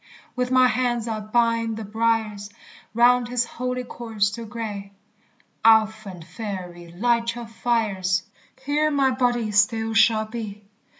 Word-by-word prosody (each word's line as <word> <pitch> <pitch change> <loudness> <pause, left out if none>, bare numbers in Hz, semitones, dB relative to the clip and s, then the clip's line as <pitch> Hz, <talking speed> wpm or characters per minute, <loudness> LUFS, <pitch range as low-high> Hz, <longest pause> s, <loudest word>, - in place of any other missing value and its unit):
With 250 0 -1
my 255 0 +5
hands 240 -2 0
I'll 220 -1 -3
bind 230 0 0
the 225 - -5
briers 220 -1 -1 0.5
Round 245 +1 +4
his 245 0 0
holy 250 +1 -4
corse 225 -4 -2
to 230 +1 -7
gre; 210 -3 -6 0.7
Ouphant 215 -5 +3
fairy, 180 -4 -7
light 235 +4 0
your 240 -1 -6
fires; 210 -5 -1 0.4
Here 300 +2 +1
my 275 -3 +2
body 245 -3 0
still 220 +2 +2
shall 225 -1 +4
be. 215 -2 -7
225 Hz, 130 wpm, -23 LUFS, 210-240 Hz, 0.7 s, my